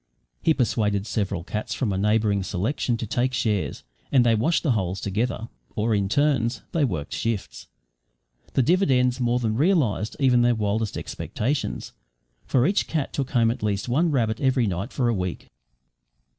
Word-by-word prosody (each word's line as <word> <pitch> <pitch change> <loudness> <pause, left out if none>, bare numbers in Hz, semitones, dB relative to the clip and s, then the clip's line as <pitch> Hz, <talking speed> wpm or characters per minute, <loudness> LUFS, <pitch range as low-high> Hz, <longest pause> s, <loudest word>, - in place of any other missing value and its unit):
He 160 - +3
persuaded 105 -5 0
several 100 -6 -2
cats 105 +4 -4
from 110 -7 -1
a - - -1
neighbouring 105 -1 +2
selection 105 - -1
to 115 - -4
take 120 +4 0
shares, 105 -5 -1 0.3
and 130 -3 +5
they 115 - +4
watched 125 +10 +1
the 150 - +2
holes 95 -4 -1
together, 115 +3 -2 0.3
or 110 0 +1
in 100 -2 +1
turns 130 -3 +1
they 165 - +1
worked 85 - -2
shifts. 115 -4 -3 0.9
The 135 - +3
dividends 130 -7 +3
more 120 0 +1
than 115 -3 0
realised 140 - +1
even 125 -3 +4
their 120 0 +3
wildest 105 0 -1
expectations, 140 +6 -3 0.5
for 125 -1 +3
each 195 +4 +1
cat 155 -4 -2
took 135 -2 -2
home 115 -3 +3
at 120 - -6
least 105 0 -1
one 155 +8 +2
rabbit 115 -6 0
every 130 -3 +2
night 95 +4 -3
for 125 -3 0
a 120 - +2
week. 90 -3 -4
115 Hz, 170 wpm, -24 LUFS, 105-130 Hz, 0.9 s, and